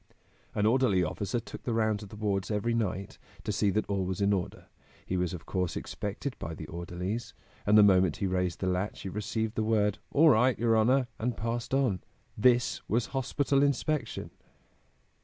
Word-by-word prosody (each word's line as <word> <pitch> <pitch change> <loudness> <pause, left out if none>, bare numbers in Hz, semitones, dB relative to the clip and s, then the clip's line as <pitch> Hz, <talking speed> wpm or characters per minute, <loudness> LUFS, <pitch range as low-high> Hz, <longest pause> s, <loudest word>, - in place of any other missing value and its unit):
"An 105 - +1
orderly 110 -5 +3
officer 100 +7 -2
took 115 - -9
the 120 - -2
rounds 110 -2 +1
of 105 - -9
the - - -10
wards 100 -2 -1
every 110 +2 0
night, 100 -4 -2 0.2
to - - -2
see 105 0 +2
that 105 +2 0
all 100 -2 -1
was 95 +1 -3
in 100 0 +3
order. 95 0 -3 0.4
He 95 - -2
was 90 -2 0
of 85 -2 -7
course 90 -3 -2
expected 105 +7 -4
by 80 - -5
the 75 - -7
orderlies, 90 +7 -5 0.3
and 105 +1 +6
the 105 - +9
moment 95 -5 +4
he - - -1
raised 90 -2 -1
the 95 - 0
latch 90 +3 -1
he 95 - -4
received 105 +2 -2
the 110 - -1
word: 105 -2 +1
'All 155 +3 +6
right, 125 0 +4
your 115 -1 +2
honor!' 125 +4 +4
and 120 +1 -1
passed 115 +3 -2
on. 125 -10 +1 0.3
This 120 +2 +3
was 115 +1 +1
hospital 135 +1 +1
inspection!" 140 -2 0
105 Hz, 190 wpm, -29 LUFS, 95-120 Hz, 0.4 s, the